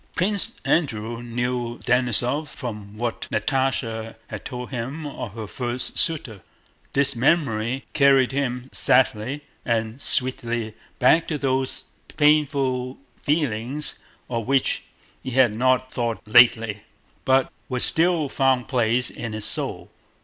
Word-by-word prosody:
Prince 200 +2 0
Andrew 115 -7 0
knew 120 0 -3
Denísov 125 +4 +1
from 105 -7 -7
what 120 0 -3
Natásha 115 -5 -1
had 105 -2 -7
told 125 -1 -6
him 135 +6 -4
of 115 -7 -6
her 110 -2 -5
first 120 +3 -3
suitor. 135 - -1 0.5
This 140 -1 +3
memory 130 -2 +1
carried 135 -3 +4
him 130 -2 -2
sadly 130 +3 +2 0.2
and 115 +2 -1
sweetly 120 -3 +1 0.2
back 160 +6 +4
to 155 - -2
those 130 -1 -1 0.3
painful 140 -4 +2 0.2
feelings 145 -1 -1 0.3
of 115 -2 -3
which 135 -1 +1 0.4
he - - -5
had 125 -3 +4
not 130 +2 +1
thought 115 -2 -1
lately, 115 -2 +5 0.4
but 130 0 +2 0.2
which 125 -1 -2
still 165 -2 +3
found 130 -2 +1
place 125 -1 +1
in 115 -1 -6
his 110 -1 -1
soul. - - -2
125 Hz, 120 wpm, -23 LUFS, 115-135 Hz, 0.5 s, lately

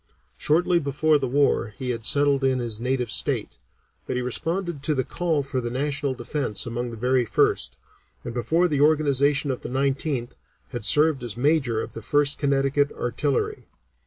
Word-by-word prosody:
Shortly 170 - +2
before 150 +1 +1
the 135 - -2
war 125 -5 +1
he 130 -2 -3
had 115 -2 -4
settled 140 0 +4
in 130 -1 +2
his 115 -3 -3
native 125 -2 -1
state, - - 0 0.5
but - - -2
he 125 - -1
responded 165 +5 -3
to 150 +1 +1
the 130 - 0
call 165 -3 -1
for 135 -1 -3
the 120 - -3
national 140 +1 -1
defence 125 -2 -3
among 120 +1 -3
the 115 - -8
very 125 +2 +2
first, 65 - +1 0.5
and 120 - -6
before 160 +9 +1
the 145 -4 0
organization 145 -2 +2
of 125 - -5
the - - -6
Nineteenth 135 -1 -1 0.4
had 120 -5 -5
served 150 0 +4
as 120 -2 -5
Major 135 -5 +1
of - - -9
the 115 - -7
First 145 +5 +1
Connecticut 140 0 +1
Artillery. 135 +3 -2
135 Hz, 175 wpm, -24 LUFS, 120-145 Hz, 0.5 s, settled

